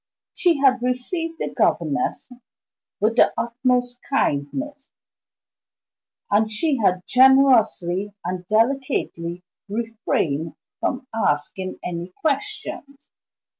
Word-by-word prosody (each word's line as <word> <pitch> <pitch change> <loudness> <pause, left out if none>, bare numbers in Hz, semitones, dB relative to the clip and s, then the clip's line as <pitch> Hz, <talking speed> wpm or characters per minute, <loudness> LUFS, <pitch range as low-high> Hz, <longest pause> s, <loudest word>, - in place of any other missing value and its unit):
She 345 -4 +2
had 265 -3 +3
received 290 +7 -2
the - - -3
governess - - 0 0.7
with 220 +3 +1
the - - +6
utmost 245 +1 0
kindness, 275 - -1 1.4
and 215 +2 +3
she 275 +7 0
had 180 -4 +2
generously 230 -8 +4
and 180 0 -4
delicately 215 -7 0 0.3
refrained 205 -9 -2 0.2
from 255 -1 -2
asking 185 -1 -1
any 175 0 -5
questions. 280 -1 -4
235 Hz, 90 wpm, -22 LUFS, 185-270 Hz, 1.4 s, the